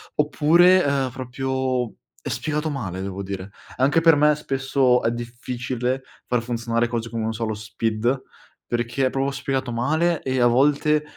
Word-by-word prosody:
oppure, 170 Hz, +5 st, +5 dB
ehm, 140 Hz, -2 st, +1 dB
proprio 130 Hz, -1 st, -2 dB, 0.3 s
è -, -, -4 dB
spiegato 150 Hz, +1 st, -2 dB
male 100 Hz, -11 st, -4 dB
devo 95 Hz, 0 st, -5 dB
dire. 95 Hz, 0 st, -6 dB, 0.3 s
Anche 140 Hz, +5 st, +3 dB
per 165 Hz, -1 st, +6 dB
me 150 Hz, +1 st, +4 dB
spesso 135 Hz, -3 st, +1 dB
è 115 Hz, -, +2 dB
difficile 125 Hz, +2 st, -3 dB, 0.2 s
far 125 Hz, -1 st, +1 dB
funzionare 115 Hz, 0 st, -1 dB
cose 115 Hz, -1 st, -3 dB
come, 115 Hz, -1 st, -3 dB
non 110 Hz, 0 st, -1 dB
so, 115 Hz, +1 st, -3 dB
lo 110 Hz, -, -2 dB
SPID, 110 Hz, +4 st, -1 dB, 0.4 s
perché 120 Hz, +2 st, 0 dB
è -, -, 0 dB
proprio 135 Hz, +1 st, -1 dB
spiegato 135 Hz, -2 st, -2 dB
male 155 Hz, +8 st, +1 dB
e 130 Hz, -1 st, -1 dB
a 120 Hz, -, +5 dB
volte 150 Hz, +4 st, +3 dB
130 Hz, 160 wpm, -23 LUFS, 115-140 Hz, 0.4 s, per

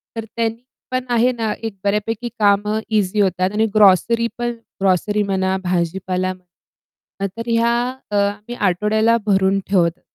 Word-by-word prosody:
तर 225 Hz, -1 st, -4 dB
त्यानी 230 Hz, +1 st, -2 dB, 0.3 s
पण 255 Hz, 0 st, -1 dB
आहे 240 Hz, +1 st, +3 dB
ना 220 Hz, -2 st, -1 dB
एक 220 Hz, -, -6 dB
बऱ्यापैकी 210 Hz, +3 st, -1 dB
कामं 210 Hz, +1 st, +2 dB
इझी 210 Hz, -1 st, +1 dB
होतात 185 Hz, -1 st, +1 dB
आणि 220 Hz, +1 st, +2 dB
ग्रोसरी 215 Hz, +4 st, +4 dB
पण 240 Hz, 0 st, -1 dB, 0.3 s
ग्रोसरी 200 Hz, +2 st, +2 dB
म्हणा 190 Hz, -1 st, 0 dB
भाजीपाला 185 Hz, +1 st, -1 dB
म्हणा 185 Hz, +2 st, -13 dB
तर 230 Hz, +1 st, -5 dB
ह्या 230 Hz, 0 st, +2 dB, 0.4 s
अ, -, -, -1 dB, 0.3 s
मी 240 Hz, -, -5 dB
आठवड्याला 215 Hz, +3 st, +2 dB
भरून 195 Hz, -1 st, +2 dB
ठेवते 175 Hz, -3 st, +1 dB
205 Hz, 140 wpm, -20 LUFS, 190-225 Hz, 0.4 s, ग्रोसरी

